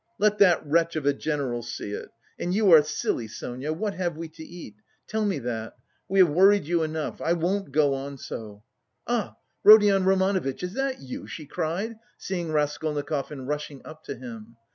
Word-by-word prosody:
"Let 210 0 +2
that 180 -5 +5
wretch 165 +3 +2
of 155 -3 -2
a 145 - +4
general 140 -5 -2
see 115 -3 -6
it! - - -6 0.3
And 180 +1 -1
you 205 -3 +4
are 160 -2 +10
silly, 145 -6 -2
Sonia: 125 +6 -5
what 200 +6 -2
have 175 -4 -2
we 165 0 -6
to 155 - -14
eat? 165 -8 -10 0.3
Tell 220 0 -2
me 200 -3 0
that. 115 -2 -5 0.3
We 195 - 0
have 185 -3 +7
worried 195 +3 +5
you 170 +1 +1
enough, 155 -1 -3
I 165 - +2
won't 175 0 -1
go 145 -1 +3
on 135 +1 -5
so! 105 -5 -8 0.4
Ah, 235 -3 -1 0.3
Rodion 205 -2 +8
Romanovitch, 190 -6 +1
is 180 +1 -3
that 270 +1 -2
you?" 130 -1 -7
she 155 - -7
cried, 180 +9 -3 0.2
seeing 175 -4 -4
Raskolnikov 150 -1 -1
and 135 -3 -7
rushing 150 -1 -4
up 155 0 -11
to 140 - -5
him. 115 -2 -10
160 Hz, 185 wpm, -26 LUFS, 140-190 Hz, 0.4 s, are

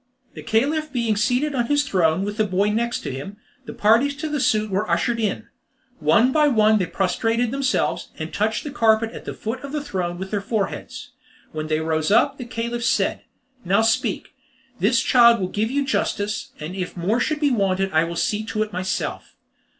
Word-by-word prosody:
The - - -9
Caliph 295 +7 0
being 235 -4 0
seated 250 +7 +1
on 240 -3 0
his 290 +1 +2
throne 185 - +1
with 205 +1 -5
the 215 - +3
boy 200 +1 +1
next 235 +3 -1
him, 140 +10 -6 0.3
the - - -7
parties 235 +7 +3
to 305 +2 -4
the 295 -1 -1
suit 215 -5 +1
were 200 +3 -1
ushered 235 -1 +1
in. 210 -3 -1 0.5
One 235 +3 +4
by 300 +1 +4
one 215 -4 +4
they 180 - -1
prostrated 225 +6 0
themselves, 275 -1 -1
and - - -6
touched - - 0
the 295 - -6
carpet 225 -4 +2
at - - -10
the - - -5
foot 230 +4 -5
of 280 - -7
the 300 -1 -3
throne 180 -10 -3
with 190 +1 -6
their 205 -2 -1
foreheads. 205 -1 -4 0.4
When 155 0 -4
they 155 0 0
rose 160 -1 0
up, 270 +7 +3
the 250 - -5
Caliph 235 0 -4
said: 230 -4 +1 0.4
"Now 195 +5 +2
speak. 225 0 0 0.5
This 230 +4 +2
child 235 -2 +6
will 185 -1 -2
give 215 +3 -1
you 280 +2 0
justice, 210 -5 -1
and 155 +4 -6
if 180 -1 -5
more 200 +8 0
should 305 +4 0
be 290 -2 +2
wanted 195 -4 +1
I 160 0 +3
will 170 0 -5
see 210 +5 0
to 215 -1 -1
it 215 -1 -9
myself." 185 +1 -3
220 Hz, 200 wpm, -22 LUFS, 195-250 Hz, 0.5 s, child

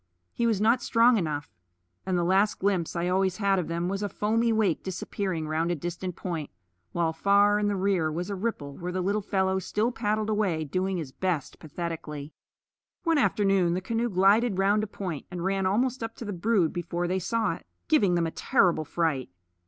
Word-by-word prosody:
He 235 - +1
was 220 -4 +1
not 230 +4 +3
strong 230 +1 +4
enough; 150 -6 -3 0.5
and 185 -1 +1
the 175 - +1
last 195 +4 +3
glimpse 185 -4 0
I 170 +1 0
always 190 0 +1
had 200 -3 +2
of 175 - -3
them 170 +1 -2
was 195 +2 -2
a 205 - -1
foamy 230 +3 +1
wake 215 -7 +1
disappearing 185 -3 -3
round 160 +2 0
a 175 - +1
distant 175 +3 -5
point, 165 -6 -4 0.4
while 165 -2 0
far 200 +4 +4
in 210 - +1
the 205 - 0
rear 185 -5 +1
was 175 +5 -3
a - - -2
ripple 185 -9 -3
where 180 0 -5
the 185 - -2
little 200 +3 0
fellow 190 -1 0
still 215 +5 -1
paddled 215 -1 -1
away, 195 -7 0
doing 185 +5 -1
his 155 -6 -5
best 175 -2 -2
pathetically. 155 -2 -6 0.7
One 330 -3 +3
afternoon 195 -8 +2
the - - 0
canoe 230 +5 -1
glided 200 +3 +3
round 200 +2 +3
a 215 - -2
point 180 -7 -5
and 180 -2 -5
ran 195 0 +1
almost 245 +6 +1
up 225 0 -4
to 235 - -8
the 205 - -4
brood 185 -2 +1
before 175 0 -2
they 185 +2 0
saw 230 +5 0
it, - - -11 0.2
giving 205 - +3
them 170 -1 +2
a 165 - -2
terrible 175 -10 +2
fright. 155 -6 -1
190 Hz, 200 wpm, -27 LUFS, 170-210 Hz, 0.7 s, strong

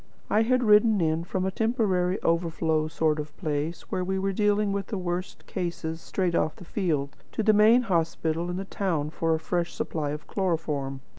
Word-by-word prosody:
I 215 - +4
had 255 +2 +2
ridden 210 -1 +5
in, 160 -1 +1
from 185 +1 -2
a 190 - 0
temporary 200 -5 +1
overflow 165 -2 +1
sort 155 -1 0
of 150 0 -7
place 155 0 -2
where 185 - 0
we 190 +1 -1
were 195 +1 0
dealing 210 0 +2
with 195 -1 -2
the 210 - -3
worst 180 0 -4
cases 170 -3 -4
straight 185 -3 -1
off 155 - +1
the 180 - -12
field, 155 -8 -1 0.2
to 220 - -1
the 215 - +5
main 220 +4 +6
hospital 165 -3 0
in 175 - -3
the 195 - -4
town 165 -7 -1
for 165 0 +1
a - - -3
fresh 170 +1 -2
supply 150 -3 -2
of 150 +1 -5
chloroform. 150 -8 -2
175 Hz, 195 wpm, -27 LUFS, 160-200 Hz, 0.2 s, main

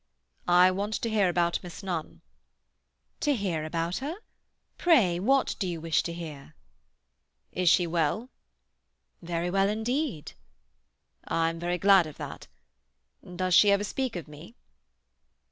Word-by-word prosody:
"I 180 +1 +6
want 205 +3 -2
to 230 - -3
hear 205 -4 +3
about 170 -1 +1
Miss 175 0 -10
Nunn." 175 -5 -5 1.0
"To 290 -2 +1
hear 185 -8 -2
about 165 +2 -2
her? 290 +6 -4 0.6
Pray, 225 - +4
what 270 +7 +2
do 190 - -1
you 170 -2 -4
wish 165 0 +1
to 170 - -5
hear?" 155 -3 -9 1.0
"Is 180 -2 +2
she 180 - +4
well?" 170 - -1 0.9
"Very 170 0 -3
well 195 +1 +2
indeed." 220 - -2 1.0
"I'm 165 0 0
very 175 +1 -1
glad 195 -2 +5
of 155 - -11
that. - - -8 0.8
Does 180 0 -3
she 205 +4 +7
ever 200 0 +2
speak 255 +3 -3
of 170 -5 -6
me?" 150 +9 -13
180 Hz, 135 wpm, -28 LUFS, 165-205 Hz, 1.0 s, she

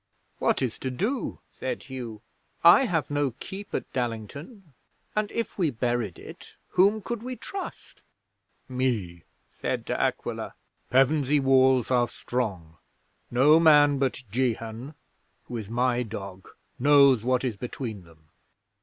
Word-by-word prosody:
'"What - - +1
is 120 -3 -3
to 130 - -3
do?" 215 - -2
said 130 - -5
Hugh. 120 -5 -7 0.4
"I 170 +11 +8
have 165 - -1
no 145 -4 0
keep 195 +1 -8
at - - -5
Dallington; 135 - -5 0.4
and 215 -1 0
if 230 -3 -4
we 170 -4 +3
buried 120 -6 -2
it, - - -12
whom 200 +3 +3
could 235 0 -4
we 255 +2 -5
trust?" 390 +9 -8 0.7
'"Me," 115 - -2 0.3
said - - -3
De - - -2
Aquila. - - -2 0.3
"Pevensey 140 +2 +3
walls 130 -2 +4
are 120 -1 +3
strong. 100 -11 -4 0.5
No 145 +6 +5
man 145 -3 +6
but 135 -1 -1
Jehan, 120 +2 -2 0.5
who 120 - -6
is 105 -3 -6
my 125 +1 +1
dog, 100 -4 -7 0.3
knows 140 -3 +6
what 125 +1 +1
is 125 -5 -1
between 110 -2 -6
them." 80 -2 -21
130 Hz, 135 wpm, -26 LUFS, 115-150 Hz, 0.7 s, I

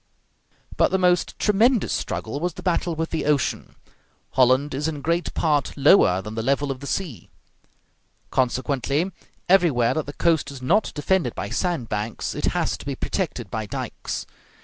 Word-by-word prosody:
But - - +4
the 190 - +1
most 180 -1 +2
tremendous 220 +2 +3
struggle 115 +6 -3
was 175 +1 -2
the - - -9
battle 175 -2 0
with 160 +1 -3
the 160 - -2
ocean. 145 -4 0 0.6
Holland 130 +3 +3
is 145 +3 -1
in 150 -3 -4
great 170 +2 0
part 150 -5 +1
lower 135 - +5
than 105 - -7
the 110 - -2
level 140 +3 0
of 130 - -5
the 140 - -8
sea; 150 - -4 1.0
consequently, 135 +6 0 0.4
everywhere 165 -11 +4
that 155 -2 -2
the 145 - -6
coast 160 -4 +1
is 140 -2 -8
not 175 +12 +2
defended 150 -4 0
by 100 +1 -4
sand 175 -10 -1
banks 105 +1 -3
it - - -3
has - - 0
to - - -10
be - - -2
protected - - -3
by - - -3
dikes. - - -5
145 Hz, 170 wpm, -23 LUFS, 130-175 Hz, 1.0 s, lower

